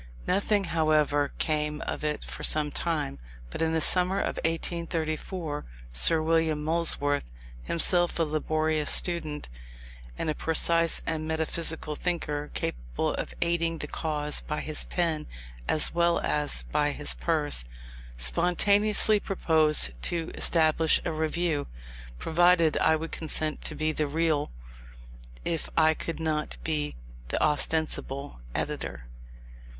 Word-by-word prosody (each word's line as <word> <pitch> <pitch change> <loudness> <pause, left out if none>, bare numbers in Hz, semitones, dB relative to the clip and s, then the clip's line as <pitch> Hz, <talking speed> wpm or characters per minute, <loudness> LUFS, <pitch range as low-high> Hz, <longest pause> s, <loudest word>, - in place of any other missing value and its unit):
Nothing, 205 0 +1
however, 155 -4 +1
came 150 -1 -1
of - - -5
it 150 0 -2
for - - -8
some 150 -1 +3
time: 155 - -2 0.3
but - - -5
in 160 0 +1
the 160 0 0
summer 185 +4 +6
of - - -2
1834 165 -1 -3 0.3
Sir 155 - +7
William 160 -2 +1
Molesworth, 150 - +1 0.3
himself 175 - +2
a 165 - +2
laborious 155 0 -1
student, 155 -4 +2 0.7
and - - -3
a 155 - 0
precise 165 +1 +2
and 155 -1 -3
metaphysical 160 -1 -3
thinker, 150 -4 -3
capable - - -3
of - - -5
aiding 170 -1 0
the 150 - -5
cause 150 -1 -1
by 150 - -4
his 155 -1 -2
pen 160 -4 -2 0.4
as 155 - +2
well 170 0 +2
as 150 -1 0
by 145 0 0
his 145 0 -3
purse, 150 - 0 0.5
spontaneously 200 - +3
proposed 155 - +3
to 165 - 0
establish 160 -1 +3
a - - -1
Review, 160 -1 -1 0.5
provided 170 - +3
I 160 - +3
would 160 +1 -5
consent 155 -1 0
to 155 - -1
be 155 +1 -1
the 155 -1 -2
real, 155 0 0 1.0
if 165 -2 -2
I 160 -1 +5
could 165 +1 -6
not 155 -1 -3
be 150 -2 -2 0.3
the - - -2
ostensible, 150 - 0 0.2
editor. - - -4
155 Hz, 125 wpm, -27 LUFS, 150-165 Hz, 1.0 s, Sir